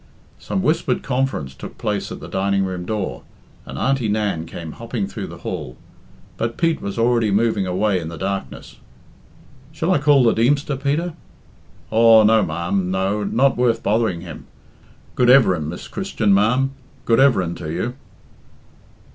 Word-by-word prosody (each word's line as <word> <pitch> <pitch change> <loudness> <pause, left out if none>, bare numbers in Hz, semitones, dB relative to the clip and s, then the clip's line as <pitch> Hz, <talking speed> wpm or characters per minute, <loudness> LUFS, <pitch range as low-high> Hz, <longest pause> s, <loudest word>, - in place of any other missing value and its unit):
Some 190 - -3
whispered 155 -6 0
conference 130 - -2
took 65 - -10
place - - -3
at - - -6
the - - -9
dining 100 0 0
room 90 -2 -5
door, 95 - -3 0.5
and - - -7
Auntie 135 -4 0
Nan 105 -6 -1
came 85 -1 -7
hopping 115 +2 -4
through - - -6
the - - -10
hall. 65 - -5 0.6
But 115 0 -3
Pete 165 -2 +1
was 100 +1 -5
already 115 -1 +2
moving 105 -1 +1
away 95 +1 +1
in 80 - -6
the 85 0 -7
darkness. 95 +3 -5 0.9
"Shall 160 +3 -1
I 175 - +2
call 145 -2 +4
the 115 - +4
Deemster, 140 +5 +1
Peter?" 145 +6 -1 0.8
"Aw, 115 0 +6
no, 110 0 +4
ma'am, 85 +3 -2
no, 95 +3 -1
not 125 +5 +2
worth 120 -2 +1
bothering 105 -5 0
him. 85 -3 -10 0.7
Good 125 -1 +2
everin', 95 - +4
Miss 85 - -7
Christian, 150 - 0
ma'am, 125 +7 +2 0.3
good 115 - +3
everin' 105 -11 +3
to 80 -2 -6
you." 90 +9 -2
110 Hz, 155 wpm, -21 LUFS, 95-125 Hz, 0.9 s, Aw